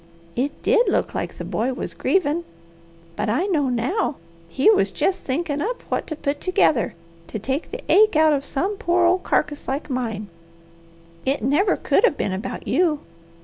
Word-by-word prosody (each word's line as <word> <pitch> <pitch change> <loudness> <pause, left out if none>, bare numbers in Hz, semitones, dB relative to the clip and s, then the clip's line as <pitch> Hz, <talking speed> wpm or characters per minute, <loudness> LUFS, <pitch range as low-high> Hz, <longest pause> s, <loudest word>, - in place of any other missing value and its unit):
It 275 +4 -2
did 475 -3 +4
look - - 0
like - - -4
the - - -5
boy 245 +4 -1
was - - -4
grievin'; 340 -3 +1 0.7
but 210 +1 -1
I 255 - +1
know 305 -9 +1
now 255 - 0 0.3
he 265 - +1
was 405 - +3
jest 380 - -1
thinkin' 290 +1 -1
up 480 +8 -3
what - - -1
to 310 - -4
put 285 -1 -3
together 310 - +2 0.3
to - - -5
take 265 - -3
the - - -7
ache 430 -2 +5
out 310 0 +5
of 280 -1 0
some 375 +9 -2
poor 350 0 +2
old 365 +2 +3
carcass 295 0 -1
like 280 +2 -3
mine. 225 -5 -3 1.0
It 270 -2 -1
never 300 - +3
could - - +2
have 465 -12 +3
been 195 - -1
about 190 +3 -5
you. 325 -5 +2
295 Hz, 180 wpm, -22 LUFS, 260-365 Hz, 1.0 s, ache